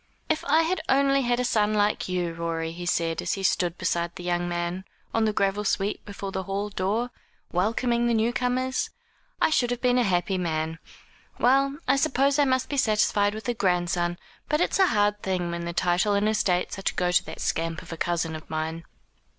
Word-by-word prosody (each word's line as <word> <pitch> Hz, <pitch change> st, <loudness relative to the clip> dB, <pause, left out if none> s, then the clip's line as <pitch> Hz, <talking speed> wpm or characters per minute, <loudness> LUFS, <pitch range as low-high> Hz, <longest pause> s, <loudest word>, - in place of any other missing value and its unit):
"If 315 Hz, +1 st, 0 dB
I 315 Hz, +2 st, +4 dB
had 355 Hz, +3 st, -1 dB
only 275 Hz, 0 st, +4 dB
had 245 Hz, -1 st, +1 dB
a 250 Hz, -, +1 dB
son 215 Hz, -2 st, +2 dB
like 205 Hz, -2 st, +1 dB
you, 175 Hz, -2 st, -1 dB
Rorie," 165 Hz, -1 st, -3 dB
he 175 Hz, +1 st, -7 dB
said, 165 Hz, -2 st, 0 dB
as -, -, -1 dB
he 195 Hz, -, -4 dB
stood 175 Hz, -2 st, +1 dB
beside 170 Hz, 0 st, -1 dB
the 180 Hz, -, -8 dB
young 175 Hz, 0 st, -1 dB
man, 175 Hz, +2 st, -2 dB, 0.3 s
on 225 Hz, -1 st, +2 dB
the 215 Hz, -, +2 dB
gravel 200 Hz, 0 st, 0 dB
sweep 200 Hz, 0 st, -1 dB
before 200 Hz, -1 st, -6 dB
the 190 Hz, -, -2 dB
hall 195 Hz, +2 st, -3 dB
door, 210 Hz, +5 st, -1 dB, 0.4 s
welcoming 235 Hz, +6 st, +1 dB
the 235 Hz, -, +2 dB
new 225 Hz, +2 st, +1 dB
comers, 255 Hz, +1 st, 0 dB, 0.5 s
"I -, -, +3 dB
should 245 Hz, -5 st, +2 dB
have 245 Hz, -1 st, -2 dB
been 250 Hz, 0 st, +3 dB
a -, -, +3 dB
happy 185 Hz, -2 st, 0 dB
man. 160 Hz, -1 st, -2 dB, 0.6 s
Well, 275 Hz, +3 st, +3 dB
I -, -, +4 dB
suppose 275 Hz, +1 st, +2 dB
I 290 Hz, -, +5 dB
must 260 Hz, -1 st, +1 dB
be 285 Hz, -, -3 dB
satisfied 210 Hz, -3 st, +2 dB
with 220 Hz, -, -7 dB
a 240 Hz, -, +1 dB
grandson; 175 Hz, -4 st, 0 dB, 0.3 s
but 300 Hz, +1 st, +2 dB
it's 355 Hz, -, +1 dB
a 380 Hz, -, +6 dB
hard 210 Hz, -3 st, +1 dB
thing 180 Hz, -2 st, -1 dB
that 170 Hz, 0 st, -4 dB
the 170 Hz, -, -3 dB
title 180 Hz, +4 st, +2 dB
and 200 Hz, +1 st, +2 dB
estates 195 Hz, -4 st, 0 dB
are 195 Hz, -, 0 dB
to -, -, -9 dB
go 180 Hz, -1 st, +1 dB
to 180 Hz, -, +3 dB
that -, -, -8 dB
scamp 165 Hz, 0 st, -2 dB
of -, -, -8 dB
a -, -, -4 dB
cousin 170 Hz, -1 st, -1 dB
of 155 Hz, -, -10 dB
mine." 160 Hz, +1 st, -3 dB
200 Hz, 215 wpm, -26 LUFS, 175-245 Hz, 0.6 s, a